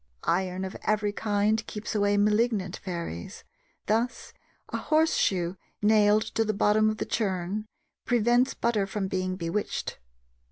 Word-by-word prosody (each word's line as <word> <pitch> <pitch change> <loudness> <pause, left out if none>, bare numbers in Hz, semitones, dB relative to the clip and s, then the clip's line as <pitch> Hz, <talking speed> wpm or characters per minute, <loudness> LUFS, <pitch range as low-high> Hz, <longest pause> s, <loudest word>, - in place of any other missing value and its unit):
Iron 185 +2 0
of 190 - -6
every 210 -1 +1
kind 210 +1 +1
keeps 210 +1 -5
away 205 -1 +2
malignant 210 -2 +1
fairies: 170 - -6 0.4
thus, 230 +2 -1 0.4
a - - -2
horseshoe 195 - +1 0.2
nailed 210 0 +4
to 225 - +2
the 215 -1 -1
bottom 215 +1 +3
of 215 - -2
the - - -2
churn 200 0 -2 0.4
prevents 240 +2 +2
butter 220 -4 0
from 195 0 -2
being 185 0 -2
bewitched. 180 +3 -3
210 Hz, 130 wpm, -27 LUFS, 190-220 Hz, 0.4 s, nailed